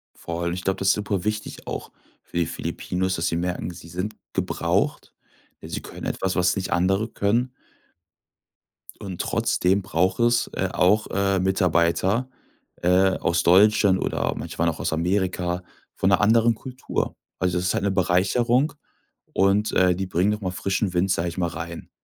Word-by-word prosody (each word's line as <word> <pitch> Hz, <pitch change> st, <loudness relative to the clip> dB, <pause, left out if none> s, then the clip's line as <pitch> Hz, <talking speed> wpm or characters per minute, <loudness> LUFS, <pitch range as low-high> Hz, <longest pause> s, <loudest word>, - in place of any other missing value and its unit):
Vor 85 Hz, 0 st, -5 dB
allem, 85 Hz, 0 st, -1 dB
ich 90 Hz, 0 st, -5 dB
glaube, 95 Hz, -, 0 dB
das 95 Hz, -, +2 dB
ist -, -, +6 dB
super 100 Hz, -3 st, -2 dB
wichtig 105 Hz, 0 st, -4 dB
auch -, -, -5 dB, 0.3 s
für -, -, -7 dB
die 85 Hz, -, +2 dB
Filipinos, 95 Hz, +4 st, -3 dB
dass 80 Hz, +1 st, -1 dB
sie 85 Hz, -, 0 dB
merken: 90 Hz, +1 st, -2 dB
Sie 85 Hz, -1 st, -12 dB
sind 90 Hz, +5 st, -4 dB, 0.2 s
gebraucht. -, -, -1 dB, 0.5 s
Sie -, -, -5 dB
können -, -, -9 dB
etwas, 95 Hz, -1 st, -2 dB
was 90 Hz, -1 st, +2 dB
nicht 95 Hz, -2 st, -3 dB
andere 95 Hz, +5 st, +1 dB
können. 115 Hz, +4 st, 0 dB, 1.5 s
Und 95 Hz, -4 st, -6 dB
trotzdem 95 Hz, +3 st, +1 dB
braucht 95 Hz, 0 st, 0 dB
es, 120 Hz, 0 st, +3 dB
äh, -, -, -1 dB
auch, 105 Hz, +4 st, +3 dB
äh, 100 Hz, 0 st, +1 dB
Mitarbeiter, 95 Hz, +5 st, +1 dB, 0.5 s
äh, 90 Hz, +2 st, +3 dB
aus 85 Hz, 0 st, +1 dB
Deutschland 100 Hz, +1 st, +5 dB
oder -, -, -1 dB
manche -, -, -6 dB
waren 85 Hz, -, +3 dB
auch 80 Hz, -, -5 dB
aus -, -, -1 dB
Amerika, 90 Hz, +1 st, -1 dB, 0.3 s
von 95 Hz, -, +1 dB
'ner 90 Hz, -, +4 dB
anderen 115 Hz, +2 st, +4 dB
Kultur. 130 Hz, +3 st, -4 dB, 0.2 s
Also, 90 Hz, -1 st, 0 dB
das 90 Hz, +1 st, 0 dB
ist -, -, -2 dB
'ne 100 Hz, 0 st, +1 dB
Bereicherung 115 Hz, -, +2 dB, 0.6 s
und, 100 Hz, +2 st, +2 dB
äh, 90 Hz, -1 st, +4 dB
die 95 Hz, +2 st, -2 dB
bringen 95 Hz, +3 st, +1 dB
noch 105 Hz, +1 st, -3 dB
mal 95 Hz, -2 st, -2 dB
frischen 95 Hz, +1 st, -1 dB
Wind, 90 Hz, +2 st, +1 dB
sage 85 Hz, 0 st, 0 dB
ich 85 Hz, -, -9 dB
mal, 85 Hz, -2 st, +1 dB
rein. 85 Hz, +1 st, -7 dB
95 Hz, 170 wpm, -24 LUFS, 90-105 Hz, 1.5 s, ist